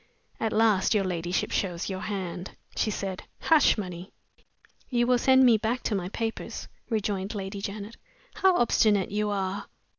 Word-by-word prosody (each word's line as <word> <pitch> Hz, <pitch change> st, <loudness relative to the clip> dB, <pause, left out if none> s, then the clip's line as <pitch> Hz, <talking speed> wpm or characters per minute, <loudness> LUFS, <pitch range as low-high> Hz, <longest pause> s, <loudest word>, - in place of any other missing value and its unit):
"At 220 Hz, -, 0 dB
last 215 Hz, -2 st, +3 dB
your 205 Hz, -, +3 dB
ladyship 175 Hz, -1 st, -1 dB
shows 175 Hz, -3 st, -1 dB
your 190 Hz, -1 st, -3 dB
hand," 185 Hz, -3 st, -5 dB, 0.2 s
she -, -, +1 dB
said. 195 Hz, -2 st, -3 dB, 0.2 s
"Hush 315 Hz, -7 st, +4 dB
money!" 180 Hz, -2 st, -6 dB, 0.8 s
"You 240 Hz, -2 st, +2 dB
will 250 Hz, 0 st, +3 dB
send 260 Hz, +1 st, +5 dB
me 235 Hz, -3 st, +6 dB
back 230 Hz, +3 st, -1 dB
to -, -, -1 dB
my 185 Hz, -3 st, -2 dB
papers," 225 Hz, +2 st, -4 dB, 0.2 s
rejoined 205 Hz, -2 st, -1 dB
Lady 195 Hz, 0 st, -5 dB
Janet. 205 Hz, +2 st, -6 dB, 0.4 s
"How 375 Hz, -2 st, +3 dB
obstinate 210 Hz, -5 st, +3 dB
you 210 Hz, 0 st, 0 dB
are!" 200 Hz, 0 st, -2 dB
205 Hz, 155 wpm, -27 LUFS, 190-225 Hz, 0.8 s, me